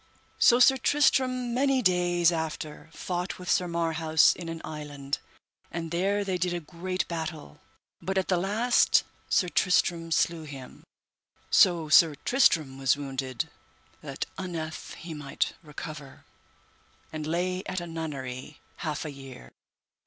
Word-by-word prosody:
So 240 0 +6
Sir 265 +2 +6
Tristram 255 -3 +2
many 265 0 +2
days 175 -2 +3
after 160 -1 -4
fought 180 +2 -4
with 180 -1 -3
Sir 180 - +2
Marhaus 165 -2 +3
in 170 -2 -7
an 165 0 -5
island, 145 -2 -5 0.5
and 165 -1 -5
there 195 +4 +1
they 190 -2 -2
did 175 0 0
a - - -2
great 185 +3 -4
battle, 160 - -6 0.4
but 190 0 -2
at 190 - +1
the 185 - +2
last 215 +7 +3 0.3
Sir 180 - +3
Tristram 170 -2 +1
slew 165 +1 +1
him, 140 -4 -10 0.7
so 170 -4 +5
Sir 155 0 +6
Tristram 155 - +2
was 135 0 +3
wounded 135 -3 -3 0.5
that - - -4
unnethe 165 -4 -5
he 170 -1 -8
might 145 -2 -2
recover, 150 -2 -9 0.9
and 155 -1 -4
lay 180 +3 -1
at 185 - -2
a 175 - -6
nunnery 145 -5 -6 0.2
half 155 -2 -3
a 150 - -4
year. 135 - -11
165 Hz, 140 wpm, -28 LUFS, 150-185 Hz, 0.9 s, So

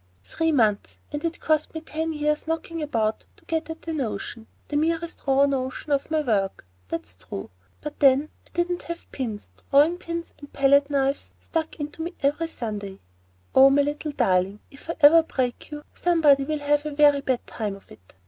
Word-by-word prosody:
Three 325 - 0
months!—and 240 +4 0
it 335 0 -2
cost 310 0 0
me 320 - -3
ten 320 0 -3
years' 300 0 -1
knocking 325 0 -3
about 225 -7 -1
to - - -21
get 325 0 -2
at 320 0 -7
the 325 - -4
notion, 225 -5 -4 0.2
the 290 - -4
merest 330 +2 0
raw 275 +1 +5
notion, 270 +2 -2
of 280 +1 +1
my 315 -1 +1
work. 200 - -1 0.2
That's 95 - -5
true; 95 +1 -8 0.3
but 300 0 -7
then 280 +1 +5 0.2
I - - -23
didn't 350 0 0
have 340 0 -8
pins, 225 -6 -5 0.2
drawing 300 +5 +4
pins, 335 -1 -5
and 285 - -12
palette 280 +1 +4
knives, 275 -1 0
stuck 320 -1 -3
into 300 +1 -6
me 345 +2 -4
every 300 +4 +1
Sunday. 210 -9 -5 0.6
Oh, 265 +1 +8
my 285 +1 +4
little 295 +1 -3
darling, 195 -5 +1
if 275 +3 -15
ever 300 +3 +9
I - - +4
break 255 -6 -3
you, 295 -1 -7
somebody 300 -6 +4
will 305 +1 -1
have 290 0 +1
a 295 - -5
very 290 -1 +5
bad 260 -3 -1
time 210 -3 -4
of 195 - -17
it. 90 +2 -17
290 Hz, 185 wpm, -25 LUFS, 255-320 Hz, 0.6 s, ever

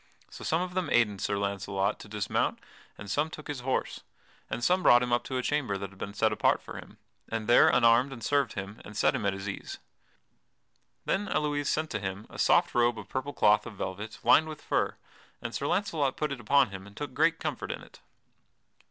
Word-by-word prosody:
So - - -10
some 165 +3 +1
of 180 0 -6
them 185 -1 -1
aided 105 -5 +2
Sir 100 - 0
Launcelot 100 0 -1
to - - -10
dismount 105 -1 -1 0.4
and 105 - -9
some 145 +10 0
took 155 -2 -9
his 145 -3 -4
horse, 130 +1 -2 0.5
and 120 - -4
some 180 +8 +3
brought 120 -7 +6
him 125 -1 -1
up 120 - +2
to 130 - -3
a 125 - -1
chamber 135 -10 0
that 100 -1 -6
had 100 - -18
been 100 - -6
set 110 +1 +2
apart - - +2
for - - -9
him, - - -13 0.3
and 115 -1 -3
there 120 - +7
unarmed 120 +3 +4
and 120 -4 -8
served 145 -1 +1
him, 95 +2 -7
and 105 0 -10
set - - +3
him 100 - -1
at 100 - +1
his 95 +1 -6
ease. 100 - -6 1.3
Then 200 +1 0
Elouise 145 -1 0
sent 155 0 -1
to 110 - -2
him 95 +2 -5
a - - -10
soft - - +4
robe 120 -1 +3
of 105 -2 -9
purple 130 +2 -3
cloth 105 -4 +3
of 115 - -9
velvet, 100 +4 -5
lined 155 - +6
with 155 - -9
fur, - - 0 0.4
and 120 0 -6
Sir 140 - -2
Launcelot 160 -8 0
put 150 -2 -1
it 140 - -4
upon 130 0 +3
him 95 0 -8
and 100 - -16
took 145 -3 -5
great 165 +3 +3
comfort - - -3
in - - -6
it. - - -16
120 Hz, 220 wpm, -29 LUFS, 100-145 Hz, 1.3 s, there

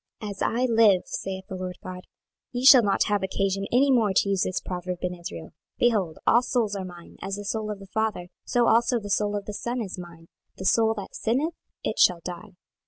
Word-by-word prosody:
26:018:003 210 - -3
As 195 - -9
I 245 +3 +1
live, 225 -6 +5
saith 190 0 -5
the 190 - -6
Lord 185 -1 -5
GOD, 185 0 -8 0.4
ye 250 +1 -3
shall 265 -2 +10
not 200 -3 +2
have 205 -2 0
occasion 195 +1 -1
any 270 +3 +4
more 225 -6 +3
to 200 - +3
use 195 -2 +1
this 185 - 0
proverb 180 0 -5
in 180 0 -1
Israel. 170 - -8
26:018:004 - - -30 0.3
Behold, 200 -10 +1
all 235 - +5
souls 230 -5 0
are 195 - -3
mine; 175 -2 -12
as 195 0 -3
the 205 0 -7
soul 215 +1 -2
of 210 - -4
the 195 - -12
father, 210 -3 -2
so 240 -1 +1
also 235 +1 +3
the 205 -2 -7
soul 205 +1 +1
of 200 -1 -4
the 210 - -6
son 240 +4 -3
is 195 -5 -5
mine: 170 -2 -11 0.3
the 190 - -6
soul 225 +2 +3
that 200 -3 -7
sinneth, 275 +9 0 0.3
it - - -2
shall 175 -2 +5
die. 180 +2 -8
200 Hz, 230 wpm, -26 LUFS, 185-225 Hz, 0.4 s, shall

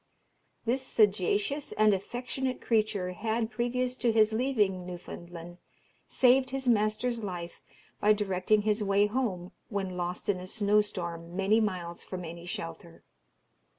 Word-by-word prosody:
This 250 +3 +1
sagacious 210 +4 +1
and 215 -1 +4
affectionate 250 +6 -3
creature 215 -5 0
had, 225 +4 -1
previous 250 +1 -1
to 235 - +2
his 220 -1 +4
leaving 215 -7 +1
Newfoundland, 175 -1 -9 0.5
saved 260 +1 +4
his 265 0 -4
master's 230 +1 +2
life 175 -3 -6 0.4
by 210 - +4
directing 205 0 +2
his 210 0 +1
way 200 0 +3
home 210 -6 -2 0.2
when 195 -3 -3
lost 175 0 -3
in 200 -3 +1
a 185 - -8
snow 210 +1 +3
storm 170 -4 -5
many 195 +3 +3
miles 180 -5 -3
from 180 -2 -6
any 170 +1 -8
shelter. 165 -1 -6
205 Hz, 135 wpm, -29 LUFS, 180-230 Hz, 0.5 s, and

